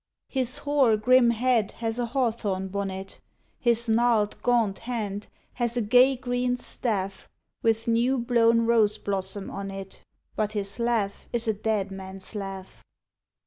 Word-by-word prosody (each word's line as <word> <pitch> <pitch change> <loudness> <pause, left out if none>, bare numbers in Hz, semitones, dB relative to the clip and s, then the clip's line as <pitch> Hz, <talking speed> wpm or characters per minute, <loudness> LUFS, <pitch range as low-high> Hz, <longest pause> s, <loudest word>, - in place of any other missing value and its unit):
His 255 -2 +1
hoar 275 -6 +3
grim 250 +2 +5
head 235 -2 +1
has 225 0 -3
a 240 - 0
hawthorn 220 -7 -1
bonnet, 195 -1 -5 0.4
His 235 -1 +2
gnarled 225 -2 +2
gaunt 230 -5 +2
hand 215 -4 -4 0.3
has 240 -1 -2
a - - +2
gay 250 +5 +5
green 245 0 -1
staff 200 -6 -3 0.3
With 225 0 +1
new 235 +3 +2
blown 235 -1 +3
rose 220 -2 +3
blossom 195 -1 -3
on 195 0 -5
it: 195 0 -9 0.3
But 215 -1 -1
his 200 0 -3
laugh 230 -4 -1
is 235 -1 -2
a 220 - +3
dead 210 -2 -1
man's 190 0 -8
laugh. 195 -2 -7
225 Hz, 145 wpm, -26 LUFS, 200-240 Hz, 0.4 s, grim